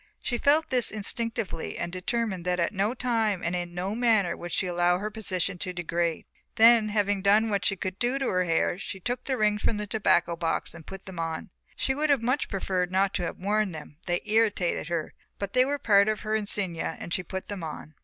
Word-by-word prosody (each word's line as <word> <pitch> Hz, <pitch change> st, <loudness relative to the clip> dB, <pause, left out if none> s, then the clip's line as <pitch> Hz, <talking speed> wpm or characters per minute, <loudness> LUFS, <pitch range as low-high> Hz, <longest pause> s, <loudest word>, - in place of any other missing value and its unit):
She 240 Hz, -, -2 dB
felt 300 Hz, +2 st, +3 dB
this 250 Hz, -2 st, +3 dB
instinctively 220 Hz, -3 st, -3 dB
and 170 Hz, -, -3 dB
determined 190 Hz, +1 st, -2 dB
that 180 Hz, 0 st, 0 dB
at 170 Hz, +4 st, +1 dB
no 205 Hz, +5 st, 0 dB
time 225 Hz, -6 st, 0 dB
and 175 Hz, +1 st, -1 dB
in 175 Hz, -1 st, -4 dB
no 185 Hz, +3 st, -2 dB
manner 220 Hz, -6 st, +2 dB
would 175 Hz, 0 st, -7 dB
she -, -, 0 dB
allow 175 Hz, 0 st, +2 dB
her 210 Hz, +3 st, -4 dB
position 190 Hz, -3 st, -2 dB
to 185 Hz, -1 st, -4 dB
degrade. 170 Hz, -1 st, -1 dB, 0.3 s
Then, 225 Hz, -1 st, +6 dB
having 205 Hz, -1 st, +1 dB
done 210 Hz, +3 st, +4 dB
what 200 Hz, 0 st, 0 dB
she 195 Hz, -, +2 dB
could 185 Hz, +1 st, -5 dB
to 245 Hz, +3 st, +1 dB
her 185 Hz, -8 st, +1 dB
hair 170 Hz, +1 st, +1 dB
she 195 Hz, 0 st, -6 dB
took 245 Hz, +7 st, -3 dB
the 265 Hz, -2 st, -1 dB
rings 210 Hz, -2 st, +2 dB
from 215 Hz, -, +1 dB
the 210 Hz, -, -3 dB
tobacco 195 Hz, -5 st, +2 dB
box 165 Hz, -1 st, -2 dB
and 165 Hz, -2 st, -12 dB
put 195 Hz, 0 st, -9 dB
them 190 Hz, -3 st, -8 dB
on. 165 Hz, +4 st, -3 dB, 0.2 s
She 265 Hz, -, 0 dB
would 300 Hz, +3 st, 0 dB
have 275 Hz, -5 st, +3 dB
much 255 Hz, +4 st, 0 dB
preferred 185 Hz, -2 st, -1 dB
not 195 Hz, +1 st, +2 dB
to 180 Hz, -, -1 dB
have -, -, -4 dB
worn 205 Hz, 0 st, 0 dB
them, 150 Hz, -1 st, -10 dB
they 175 Hz, 0 st, 0 dB
irritated 210 Hz, -7 st, +1 dB
her, 170 Hz, -2 st, -2 dB, 0.2 s
but 200 Hz, -1 st, -4 dB
they 255 Hz, 0 st, +5 dB
were 285 Hz, +2 st, -1 dB
part 200 Hz, -5 st, +4 dB
of 215 Hz, -, -1 dB
her 215 Hz, -, -2 dB
insignia 195 Hz, -6 st, -2 dB
and 170 Hz, -, -5 dB
she -, -, +1 dB
put 190 Hz, +2 st, -6 dB
them 200 Hz, -4 st, -5 dB
on. 155 Hz, -1 st, -7 dB
200 Hz, 225 wpm, -27 LUFS, 175-220 Hz, 0.3 s, Then